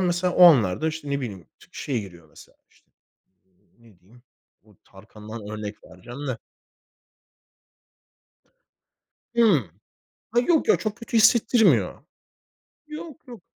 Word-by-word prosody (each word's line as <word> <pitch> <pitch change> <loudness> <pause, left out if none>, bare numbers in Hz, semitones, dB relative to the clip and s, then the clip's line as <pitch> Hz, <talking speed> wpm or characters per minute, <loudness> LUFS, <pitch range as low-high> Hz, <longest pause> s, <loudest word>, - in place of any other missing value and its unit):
mesela 180 0 0
o 180 - +7
anlarda 145 - +4
işte 155 -2 -6
ne 140 0 -1
bileyim, 100 -8 -7
ş - - -19
şey 130 -5 -3
geliyor 85 -5 -14
mesela, - - -18
işte - - -31 0.9
ne 115 -6 -22
diyeyim, 115 +7 -22 0.4
bu 105 -1 -24
Tarkan'dan 105 +3 -12
örnek 105 -1 -6
vereceğim 120 +10 -10
de. 125 - -3 3.0
Hımm. 175 - +3 0.6
Ha 240 - +3
yok 315 +6 +1
ya, - - +5
çok 215 -2 -4
kötü 230 0 -3
hissettirmiyor. 225 +1 +3 0.9
Yok 305 0 -9
yok. 235 -7 -11
140 Hz, 120 wpm, -24 LUFS, -, 3.0 s, o